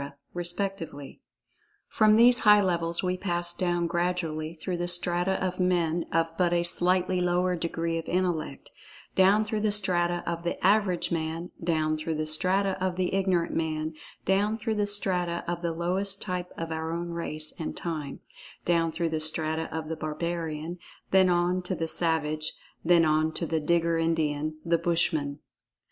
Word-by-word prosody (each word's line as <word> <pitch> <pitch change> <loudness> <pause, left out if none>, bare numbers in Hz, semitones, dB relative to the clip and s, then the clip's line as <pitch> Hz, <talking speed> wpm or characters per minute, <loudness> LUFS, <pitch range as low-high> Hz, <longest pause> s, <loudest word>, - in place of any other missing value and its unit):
respectively. 175 -5 -3 0.7
From 215 -1 +4
these 240 +2 +7
high 210 -1 +6
levels 170 -2 -1
we 185 0 0
pass 175 -2 -1
down, 175 -1 0
gradually, 170 -2 -2
through 175 +2 -4
the 175 0 -2
strata 175 +1 +3
of 185 0 -3
men 175 -2 +1
of 165 0 0
but 175 -1 +3
a 170 0 +2
slightly 180 +1 +2
lower 180 +1 +1
degree 165 -1 -2
of[Pg 165 - -7
34] 180 - 0
intellect—down 185 +4 0
through 215 0 -2
the 210 0 +1
strata 175 -4 +1
of 170 0 -3
the 175 +1 -3
"average 195 -3 +2
man"—down 160 -1 -2
through 155 +1 -3
the 155 0 -2
strata 185 +4 +1
of 185 -1 0
the 185 0 -1
ignorant 185 -3 +1
man—down 165 +6 -2
through 225 0 -2
the 210 -1 0
strata 180 -4 +1
of 175 0 -3
the 170 -1 -1
lowest 185 +4 -1
type 180 -2 -4
of 165 0 -4
our 160 0 -3
own 170 +1 -3
race 155 -2 -2
and 160 - -4
time—down 165 +1 -3
through 170 0 -1
the 160 0 -1
strata 160 +1 0
of 160 -1 -4
the 160 - -3
barbarian, 160 +1 -4 0.3
then 190 -1 +5
on 175 +1 +1
to 180 +1 -3
the 165 -1 -2
savage, 155 -2 0 0.3
then 170 -1 +5
on 155 +1 +2
to 165 - -3
the 160 0 -1
Digger 165 +1 +1
Indian, 155 -2 0
the 170 0 +2
Bushman. 160 -4 0
170 Hz, 160 wpm, -27 LUFS, 160-180 Hz, 0.7 s, these